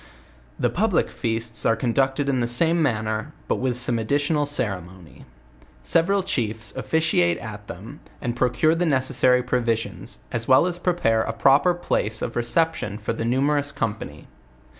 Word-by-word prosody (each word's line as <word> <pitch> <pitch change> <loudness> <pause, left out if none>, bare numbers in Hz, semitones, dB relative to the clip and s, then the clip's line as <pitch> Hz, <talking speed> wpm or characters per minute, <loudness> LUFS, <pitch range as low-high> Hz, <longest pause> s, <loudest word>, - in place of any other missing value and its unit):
The - - +1
public 200 -1 +1
feasts 115 -1 -2
are 115 - +3
conducted 135 +4 0
in 135 -2 +1
the 120 - 0
same 165 +8 +2
manner, 110 0 -1
but - - 0
with 125 -2 -1
some 120 -1 +2
additioral 145 +6 0
ceremony. 95 - -4 0.6
Several 190 - +2
chiefs 115 - -2
officiate 130 - +1
at 105 -2 -9
them, 110 - -9 0.2
and 120 -3 -3
procure 125 +6 +2
the 170 +1 0
necessary 130 -2 +2
provisions, 120 -3 -2
as 115 -1 -2
well 130 +5 +5
as 175 -1 -3
pre 180 0 +1
pare 115 -10 +1
a 115 - -2
proper 140 +9 +4
place 110 -10 -1
of 115 - -4
reception 120 - 0
for 110 +1 -3
the 115 - -4
numerous 140 +4 +1
company. 110 -5 -4
125 Hz, 155 wpm, -23 LUFS, 115-145 Hz, 0.6 s, well